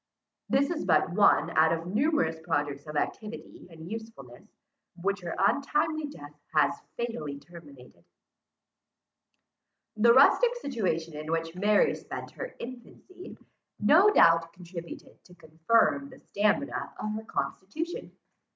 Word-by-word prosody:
This 280 Hz, +3 st, +2 dB
is 325 Hz, -, -3 dB
but -, -, +2 dB
one 180 Hz, -3 st, +4 dB
out 160 Hz, +1 st, +5 dB
of 165 Hz, 0 st, -2 dB
numerous 205 Hz, -, +1 dB
projects 145 Hz, -3 st, -2 dB
of 150 Hz, -, -7 dB
activity 210 Hz, +8 st, -5 dB
and 160 Hz, -1 st, -11 dB
usefulness, 215 Hz, -, -9 dB, 0.5 s
which 200 Hz, +3 st, -2 dB
her 170 Hz, -2 st, -5 dB
untimely 295 Hz, -, +1 dB
death 145 Hz, -, -11 dB, 0.2 s
has 150 Hz, -, +4 dB, 0.2 s
fatally 155 Hz, -12 st, -4 dB
terminated. 140 Hz, -, -15 dB, 1.9 s
The 230 Hz, +2 st, +5 dB
rustic 470 Hz, -, +5 dB
situation 185 Hz, -, -3 dB
in 155 Hz, +1 st, -6 dB
which 165 Hz, 0 st, -2 dB
Mary 205 Hz, +3 st, +3 dB
spent -, -, -8 dB
her -, -, -8 dB
infancy, 255 Hz, +10 st, -11 dB, 0.4 s
no 315 Hz, -, +6 dB
doubt 165 Hz, -, +5 dB
contributed 170 Hz, -1 st, -10 dB
to 180 Hz, -, -18 dB
confirm 175 Hz, -, +1 dB
the 260 Hz, -, -14 dB
stamina 210 Hz, +7 st, -1 dB
of 215 Hz, -, -3 dB
her 220 Hz, +1 st, -5 dB
constitution. 315 Hz, -, -4 dB
195 Hz, 125 wpm, -28 LUFS, 160-255 Hz, 1.9 s, no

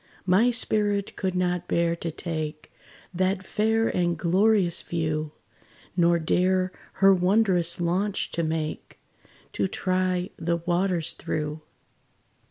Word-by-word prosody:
My 190 Hz, +7 st, +4 dB
spirit 210 Hz, -4 st, 0 dB
could 190 Hz, -2 st, -2 dB
not 180 Hz, -1 st, -1 dB
bear 170 Hz, 0 st, +1 dB
to 170 Hz, -, -3 dB
take 155 Hz, -2 st, -5 dB, 0.4 s
That 185 Hz, +1 st, 0 dB
fair 225 Hz, +1 st, +1 dB
and 175 Hz, -2 st, 0 dB
glorious 185 Hz, +1 st, +2 dB
view, 155 Hz, -2 st, -2 dB, 0.6 s
Nor 170 Hz, -1 st, +4 dB
dare 185 Hz, +3 st, +1 dB, 0.2 s
her 195 Hz, 0 st, +5 dB
wondrous 180 Hz, -2 st, +2 dB
launch 185 Hz, +4 st, -1 dB
to 170 Hz, -, -1 dB
make, 160 Hz, -1 st, -4 dB, 0.5 s
To 100 Hz, -, 0 dB
try 185 Hz, -, -1 dB
the 170 Hz, +1 st, 0 dB
waters 175 Hz, 0 st, 0 dB
through. 150 Hz, 0 st, -4 dB
180 Hz, 115 wpm, -26 LUFS, 170-190 Hz, 0.6 s, her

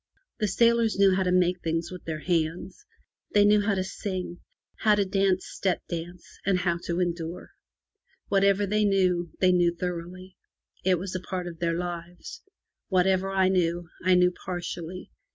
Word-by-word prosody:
The 210 Hz, -, +1 dB
sailors 230 Hz, +2 st, +3 dB
knew 195 Hz, -1 st, +5 dB
how 190 Hz, -, +1 dB
to 180 Hz, -1 st, +1 dB
make 180 Hz, 0 st, +2 dB
things 165 Hz, +1 st, -2 dB
with 180 Hz, -2 st, -9 dB
their 155 Hz, -2 st, -4 dB
hands; 170 Hz, +2 st, -2 dB, 0.5 s
they 205 Hz, 0 st, +6 dB
knew 210 Hz, 0 st, +5 dB
how 205 Hz, -1 st, +1 dB
to 185 Hz, -, 0 dB
sing, 185 Hz, -2 st, -5 dB, 0.4 s
how 215 Hz, -1 st, +4 dB
to 205 Hz, -1 st, +1 dB
dance 195 Hz, -1 st, +1 dB
step 190 Hz, -3 st, -2 dB
dance, 175 Hz, +1 st, -7 dB
and 195 Hz, -1 st, +2 dB
how 175 Hz, -2 st, 0 dB
to 170 Hz, +1 st, -1 dB
endure. 170 Hz, 0 st, -3 dB, 0.8 s
Whatever 200 Hz, 0 st, +3 dB
they 210 Hz, +2 st, +1 dB
knew, 185 Hz, -4 st, +2 dB
they 185 Hz, -1 st, +4 dB
knew 175 Hz, -1 st, +3 dB
thoroughly. 180 Hz, +1 st, -6 dB, 0.5 s
It 185 Hz, -1 st, +3 dB
was 185 Hz, +2 st, -5 dB
a 185 Hz, -, -2 dB
part 180 Hz, 0 st, -5 dB
of 170 Hz, -2 st, -8 dB
their 170 Hz, -1 st, 0 dB
lives. 175 Hz, -, -6 dB, 0.5 s
Whatever 190 Hz, 0 st, +2 dB
I 190 Hz, -1 st, +2 dB
knew, 175 Hz, -2 st, 0 dB
I 185 Hz, 0 st, +4 dB
knew 180 Hz, 0 st, +4 dB
partially. 175 Hz, -1 st, -6 dB
180 Hz, 170 wpm, -27 LUFS, 175-195 Hz, 0.8 s, they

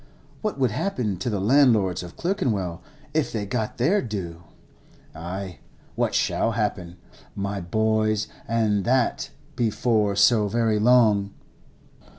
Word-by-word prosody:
What 215 Hz, -6 st, -2 dB
would 130 Hz, -4 st, +1 dB
happen 110 Hz, -, -2 dB
to 95 Hz, -, -3 dB
the 105 Hz, -3 st, -1 dB
landlords 110 Hz, -5 st, +3 dB
of 90 Hz, -1 st, -10 dB
Clerkenwell 110 Hz, -, -1 dB, 0.3 s
if 155 Hz, -1 st, 0 dB
they 105 Hz, -3 st, -3 dB
got 110 Hz, +1 st, -3 dB
their 170 Hz, -, +2 dB
due? 90 Hz, -8 st, -5 dB, 0.7 s
Ay, 90 Hz, +3 st, -6 dB, 0.3 s
what -, -, -1 dB
shall 115 Hz, -, +1 dB
happen, 100 Hz, -5 st, -3 dB, 0.4 s
my 100 Hz, 0 st, -3 dB
boys, 110 Hz, +3 st, 0 dB, 0.2 s
and 110 Hz, -3 st, +1 dB
that 125 Hz, +2 st, +1 dB, 0.3 s
before 110 Hz, -3 st, +1 dB
so 105 Hz, +1 st, +4 dB
very 110 Hz, 0 st, +1 dB
long? 105 Hz, -4 st, +3 dB
110 Hz, 125 wpm, -24 LUFS, 100-120 Hz, 0.7 s, so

